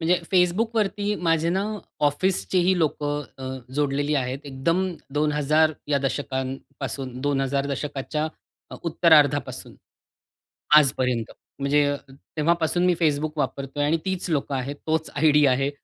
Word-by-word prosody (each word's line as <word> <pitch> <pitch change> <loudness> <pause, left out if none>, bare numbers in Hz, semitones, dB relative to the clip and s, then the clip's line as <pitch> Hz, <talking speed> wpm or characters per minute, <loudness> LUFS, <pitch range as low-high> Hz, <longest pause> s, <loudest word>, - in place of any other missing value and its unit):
म्हणजे 170 +2 +2
Facebookवरती 205 +3 +1
माझे 165 0 +2
ना 190 +3 +1 0.4
ऑफिसचे 185 +5 0
ही 185 +1 +3
लोकं 145 -2 -1 0.2
अ, 130 - -9 0.3
जोडलेली 145 0 0
आहेत. 130 -1 -1
एकदम 165 +7 0 0.3
2000 150 +1 +2 0.2
या 145 -1 +2
दशकांपासून, 135 -1 -4
2000 140 0 0
दशकाच्या 145 +2 -3 0.5
अ, - - -7
उत्तरार्धापासून 150 -4 +3 1.0
आजपर्यंत. 125 -5 +2 0.3
म्हणजे 145 +1 +3 0.3
तेव्हापासून 165 +5 0
मी 180 - +4
Facebook 150 -1 +1
वापरतोय 140 0 -2
आणि 160 +3 +2
तीच 190 -1 -2
लोकं 140 -3 -1
आहेत. 135 +2 -3
तोच 160 0 0
आयडी 150 0 +4
आहे 135 +1 +2
150 Hz, 115 wpm, -24 LUFS, 140-165 Hz, 1.0 s, मी